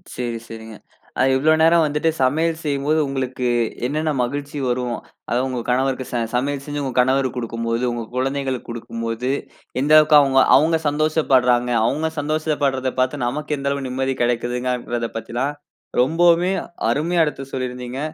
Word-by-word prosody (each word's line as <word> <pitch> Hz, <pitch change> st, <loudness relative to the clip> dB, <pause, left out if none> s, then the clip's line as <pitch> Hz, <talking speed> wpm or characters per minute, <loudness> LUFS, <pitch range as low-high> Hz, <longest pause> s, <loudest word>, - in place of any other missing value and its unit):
சேரி, 120 Hz, -2 st, -3 dB
சேரிங்க. 110 Hz, -1 st, -9 dB, 0.4 s
அ, -, -, +4 dB
இவ்வளோ 155 Hz, +4 st, +4 dB
நேரம் 165 Hz, 0 st, +5 dB
வந்துட்டு 150 Hz, +2 st, 0 dB
சமையல் 160 Hz, +5 st, +1 dB
செய்யும்போது 145 Hz, +1 st, 0 dB
உங்களுக்கு 130 Hz, -2 st, -2 dB, 0.4 s
என்னென்ன 155 Hz, +3 st, -1 dB
மகிழ்ச்சி 145 Hz, +4 st, -3 dB
வரும்? 125 Hz, -1 st, -1 dB, 0.3 s
அதாவது 125 Hz, +3 st, +1 dB
உங்க 125 Hz, -1 st, -3 dB
கணவருக்கு 130 Hz, +1 st, 0 dB
ச -, -, -4 dB, 0.2 s
சமையல் 140 Hz, +2 st, -1 dB
செஞ்சு, 145 Hz, 0 st, -4 dB
உங்க 130 Hz, -, -3 dB
கணவருக்கு 130 Hz, 0 st, +2 dB
குடுக்கும்போது, 115 Hz, 0 st, -2 dB
உங்க 120 Hz, -1 st, -4 dB
குழந்தைகளுக்கு 135 Hz, 0 st, -2 dB
குடுக்கும்போது, 115 Hz, +1 st, -4 dB, 0.5 s
எந்த 150 Hz, +2 st, +2 dB
அளவுக்கு 155 Hz, 0 st, +6 dB
அவுங்க 135 Hz, -1 st, +3 dB, 0.2 s
அவுங்க 160 Hz, +4 st, +4 dB
சந்தோஷப்பட்றாங்க? 135 Hz, -5 st, +2 dB, 0.2 s
அவுங்க 160 Hz, +6 st, 0 dB
சந்தோசப்பட்றத 145 Hz, -3 st, 0 dB
பாத்து, 130 Hz, +3 st, +1 dB
நமக்கு 150 Hz, +4 st, -2 dB
எந்த 140 Hz, 0 st, -2 dB
அளவு 140 Hz, -1 st, -3 dB
நிம்மதி 130 Hz, +1 st, -1 dB
கிடைக்குங்கிறதா 120 Hz, 0 st, -1 dB
பத்திலா, 120 Hz, +3 st, -3 dB, 0.6 s
ரொம்பவுமே 170 Hz, +6 st, +3 dB, 0.4 s
அருமையா 165 Hz, +7 st, +2 dB
எடுத்து 135 Hz, -2 st, -5 dB
சொல்லிருந்தீங்க. 125 Hz, 0 st, -4 dB
135 Hz, 140 wpm, -21 LUFS, 125-150 Hz, 0.6 s, அளவுக்கு